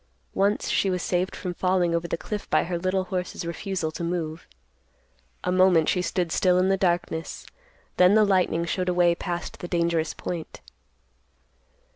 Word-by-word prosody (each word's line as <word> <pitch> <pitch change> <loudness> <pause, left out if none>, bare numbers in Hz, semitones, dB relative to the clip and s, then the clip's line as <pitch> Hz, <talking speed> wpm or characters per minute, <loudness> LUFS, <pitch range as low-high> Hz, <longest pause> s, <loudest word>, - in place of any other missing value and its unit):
Once, 200 +2 +1
she 195 - +2
was 180 -1 -1
saved 180 +1 -1
from 180 -2 -4
falling 180 -1 +1
over 170 0 -1
the 170 - -2
cliff 210 +4 -6
by - - +3
the 175 +1 -3
little 185 +1 0
horse's 180 -1 -4
refusal 170 -1 -3
to 170 - -6
move. 170 -2 -3 1.0
A - - 0
moment 185 -3 +4
she 180 - +1
stood 180 -2 -1
still 180 +1 +3
in 185 +1 +3
the 195 - +4
darkness; 175 -3 -2 0.5
then 180 +3 +6
the 215 -1 +6
lightning 185 -4 +2
showed 180 +2 -1
a 180 - 0
way 175 -1 +4
past 175 0 -5
the 175 - -6
dangerous 170 -2 0
point. 170 -3 -6
180 Hz, 170 wpm, -25 LUFS, 170-185 Hz, 1.0 s, then